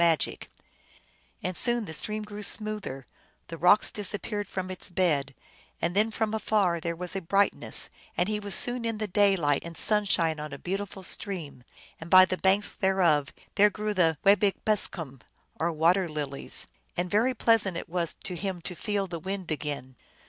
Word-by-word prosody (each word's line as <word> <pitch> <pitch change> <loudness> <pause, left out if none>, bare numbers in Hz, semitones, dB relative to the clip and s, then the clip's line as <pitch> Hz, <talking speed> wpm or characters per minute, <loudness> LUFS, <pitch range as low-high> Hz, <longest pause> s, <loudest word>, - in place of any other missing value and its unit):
magic; 165 -2 0 0.9
1 - - -2
and 185 - -6
soon 240 +1 +2
the 160 - -6
stream 215 +6 -3
grew 210 0 -8
smoother, 210 - -4 0.4
the 165 - -5
rocks 180 +5 +5
disappeared 205 0 -4
from 185 -1 -4
its 185 - -5
bed, 150 -7 0 0.4
and 170 +2 -1
then 215 +2 +3
from 220 -1 -2
afar 205 -5 +1
there 170 +1 -3
was 180 +2 -4
a 195 - -2
brightness, 195 +4 +2 0.3
and - - +2
he 210 0 -1
was 200 -3 -1
soon 245 0 +2
in 230 -1 -2
the 215 - -2
daylight 190 -7 +2
and 170 -1 -6
sunshine 185 -7 +3
on 150 -1 -6
a 140 - -6
beautiful 195 +3 -5
stream, 170 -10 -4 0.4
and 160 - -9
by 185 0 +9
the 185 - -2
banks 195 +2 +2
thereof 175 -7 +2 0.2
there 210 +1 +5
grew 210 0 -3
the 165 -5 +2
wabeyu 200 0 +5
beskwan, 165 - -1 0.4
or 170 +2 +1
water 170 +3 +2
lilies, 145 -3 -2 0.3
and 175 0 -2
very 240 +5 +2
pleasant 205 -6 +2
it - - -6
was 170 -1 -2
to 180 - -5
him 190 0 -4
to 175 +2 -5
feel 200 +3 -2
the 170 -3 -6
wind 190 0 -5
again. 145 -4 -4
185 Hz, 180 wpm, -27 LUFS, 165-205 Hz, 0.9 s, by